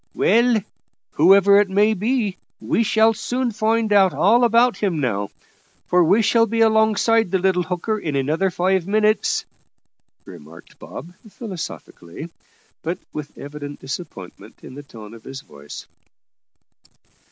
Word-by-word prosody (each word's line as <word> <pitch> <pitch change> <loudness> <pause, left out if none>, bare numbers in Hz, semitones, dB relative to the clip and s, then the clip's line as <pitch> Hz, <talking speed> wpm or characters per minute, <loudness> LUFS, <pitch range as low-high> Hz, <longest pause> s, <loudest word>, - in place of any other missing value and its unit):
"Well, 235 +1 +3 0.6
whoever 195 +5 +5
it 205 - -2
may 205 +3 +2
be, 215 -1 -2 0.2
we - - -1
shall 225 0 +3
soon 245 +3 -3
find 220 0 0
out 195 -2 +4
all 230 +6 +3
about 235 +1 +3
him 185 -7 -2
now, 100 -7 -2 0.6
for 180 0 +3
we 195 +7 +3
shall 230 +2 +3
be 225 +1 -1
alongside 220 -1 +2
the 190 - +1
little 185 -1 +1
hooker 180 +5 -3
in 155 -7 -4
another 155 +8 0
five 185 0 -1
minutes," 215 +1 +1 0.8
remarked 80 +3 -15
Bob 170 +6 -10 0.2
philosophically, 170 - -9 0.5
but 170 +3 -3 0.2
with 150 -1 -8
evident 145 0 -9
disappointment 115 - -9
in - - -11
the 145 - -9
tone 110 -6 -13
of 115 - -14
his 135 0 -9
voice. 70 - -12
190 Hz, 135 wpm, -20 LUFS, 150-220 Hz, 0.8 s, whoever